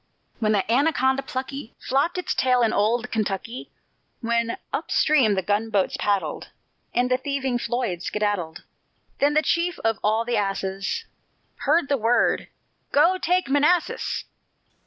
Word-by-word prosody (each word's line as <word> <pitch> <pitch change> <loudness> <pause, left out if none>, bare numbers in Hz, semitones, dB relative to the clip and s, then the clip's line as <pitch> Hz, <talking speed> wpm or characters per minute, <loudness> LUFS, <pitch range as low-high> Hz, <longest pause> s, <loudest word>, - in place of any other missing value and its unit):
When 215 -2 +1
the 200 -2 +1
Anaconda 265 0 +2
plucky 265 -1 -6
Flopped 280 +7 0
its 360 - -1
tail 250 -1 +2
in 225 - +2
old 230 +4 +1
Kentucky; 215 +2 -3 0.5
When 235 0 0 0.2
up - - -3
stream 265 -9 +3
the 190 - -1
gunboats 205 0 0
paddled, 200 -2 -1 0.4
And 250 +1 +1
the 255 - +4
thieving 265 -2 -2
Floyd 235 -9 -2
skedaddled, 205 -6 -2 0.6
Then 290 +1 +3
the 310 - +4
chief 340 0 0
of 225 -1 +1
all 220 +2 +2
the 240 - 0
asses 195 - -2 0.6
Heard 305 0 +3
the 280 - +1
word: 230 0 +2 0.4
Go, 350 +6 +4
take 360 -2 +1
Manassas! 295 +5 +1
245 Hz, 135 wpm, -24 LUFS, 210-280 Hz, 0.6 s, the